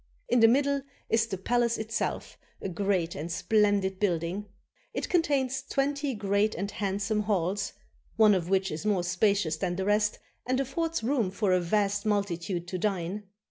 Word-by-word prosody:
In 245 - +4
the 225 - +8
middle 280 +3 +2 0.3
is 225 0 +2
the 195 -4 -4
palace 235 +4 +1
itself, 220 0 -3 0.2
a - - -4
great 185 -2 0
and 165 +4 -5
splendid 200 0 +2
building. 180 +1 -1 0.5
It - - -2
contains 275 -6 +1
twenty 280 0 -1
great 205 +1 +1
and 200 +1 -3
handsome 205 +2 -1
halls, 195 -1 0 0.4
one 215 -2 +6
of 180 -2 -1
which 190 0 +1
is 155 +4 -4
more 205 -4 +1
spacious 180 -2 +1
than 175 0 -1
the 190 +1 -2
rest 210 +1 +2 0.3
and 255 +1 +1
affords 325 +3 -1
room 235 -5 +1
for 200 0 0
a 185 - +4
vast 205 +3 0
multitude 180 -4 -1
to 185 - -3
dine. 195 +1 -2
205 Hz, 165 wpm, -28 LUFS, 185-225 Hz, 0.5 s, the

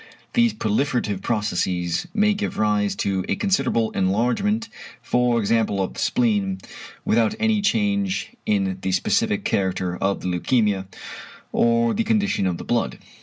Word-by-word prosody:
These 235 -2 +3
proliferative 110 -3 0
processes 95 - -1
may 210 +1 +3
give 205 +1 -3
rise 105 -1 +1
to 95 -2 0
a - - +2
considerable 195 - +1
enlargement, 125 - 0 0.3
for 120 0 +1
example, 110 -1 +1
of 95 - -1
the - - -8
spleen, 105 -6 +1 0.5
without 115 - +2
any 220 -1 +2
change 200 -1 0 0.2
in 95 -2 0
the 95 - -1
specific - - +1
character 95 -2 0
of 100 0 -1
the - - -4
leukæmia, 95 +1 +1 0.6
or 115 0 +2
the 230 - 0
condition 210 - +1
of 90 -2 -1
the - - -7
blood. 120 -1 -1
115 Hz, 140 wpm, -23 LUFS, -, 0.6 s, These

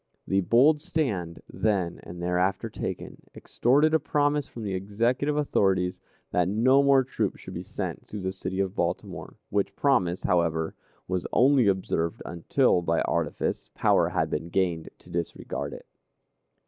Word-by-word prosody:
The 95 0 +2
bold 130 - +4
stand, 110 - -2
then 95 -6 -1
and 85 0 -8
thereafter 90 +2 0
taken, - - -5
extorted 145 +6 +2
a 160 - +5
promise 145 -1 +1
from 115 - -8
the 100 -2 -3
Executive 115 +10 0
authorities 95 -10 +1 0.3
that 90 0 +2
no 130 +7 +4
more 140 -1 +5
troops 130 - -2
should - - -9
be - - -4
sent - - -5
through 105 - -6
the 95 0 -2
city 95 0 -5
of 95 -1 0
Baltimore, - - -3 0.2
which 100 0 0
promise, 95 -11 +1
however, 80 -3 +1 0.3
was 90 -1 -2
only 130 -2 +4
observed 90 -4 0
until, 90 +4 +2
by 85 -1 +1
artifice, - - -2
power - - +3
had - - -1
been 80 +3 -3
gained 85 -3 0
to - - -16
disregard 85 -1 -4
it. - - -10
100 Hz, 150 wpm, -27 LUFS, 90-130 Hz, 0.3 s, a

